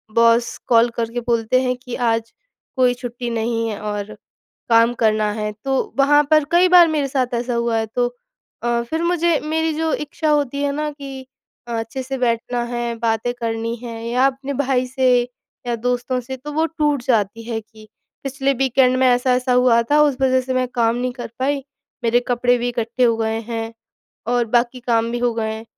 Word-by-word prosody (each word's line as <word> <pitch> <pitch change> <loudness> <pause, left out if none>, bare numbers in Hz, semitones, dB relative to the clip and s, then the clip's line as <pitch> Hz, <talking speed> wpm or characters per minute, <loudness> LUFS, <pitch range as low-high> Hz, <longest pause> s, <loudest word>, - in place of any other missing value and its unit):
Boss 230 0 +3
call 235 0 +5
करके 230 +1 -2
बोलते 235 +1 +1
हैं 255 -1 0
कि, 250 -1 -7
"आज 230 -1 -1 0.4
कोई 250 -2 +3
छुट्टी 245 0 -6
नहीं 230 0 -1
है 210 - -5
और 210 -1 -4 0.6
काम 230 +1 +5
करना 215 -1 +2
है।" 210 0 -3
तो 270 -1 +2 0.2
वहाँ 290 +2 +5
पर 310 -1 +6
कई 350 +2 +5
बार 355 -1 +8
मेरे 300 -3 0
साथ 255 -2 -1
ऐसा 240 +1 -2
हुआ 235 -1 0
है। 225 - 0
तो 245 +3 -1 0.6
अ, 240 0 +1
फिर 320 +8 -3
मुझे 340 -2 +2
मेरी 320 +1 0
जो 320 +1 -1
इच्छा 300 +1 -2
होती 285 -2 0
है 285 - +1
ना 300 0 -2
कि 275 -2 -9 0.4
अ, - - -7
अच्छे 225 +4 -5
से 270 +1 -4
बैठना 240 0 -1
है, 240 -1 -3
बातें 225 +1 0
करनी 230 0 -2
हैं 230 -2 -6
या 245 +3 +2
अपने 275 +1 -4
भाई 260 -2 0
से 260 0 +1 0.6
या 240 - 0
दोस्तों 245 +2 -1
से, 260 +2 -7
तो 295 +4 -8
वो 315 +2 +2
टूट 295 -5 -1
जाती 230 -2 0
है 225 -1 -3
कि 215 0 -17 0.4
पिछले 275 0 0
वीकेंड 260 0 +2
में 260 - +4
ऐसा-ऐसा 250 0 +2
हुआ 245 -2 +4
था, 300 +1 +5
उस 290 -3 +3
वजह 260 -1 +3
से 260 0 -3
मैं 255 0 +1
काम 235 -2 +1
नहीं 250 +1 -2
कर 245 -1 -6
पाई, 275 +1 0 0.4
मेरे 235 +1 +3
कपड़े 245 0 +2
भी 240 0 -2
इकट्ठे 235 +1 -1
हो 230 -2 +4
गए 225 0 -1
हैं, 225 0 -4 0.5
और 240 0 +1
बाकी 240 +1 0
काम 230 -2 +1
भी 240 - -1
हो 240 0 +1
गए 220 -1 -2
हैं। 220 +1 -7
245 Hz, 200 wpm, -20 LUFS, 230-270 Hz, 0.6 s, बार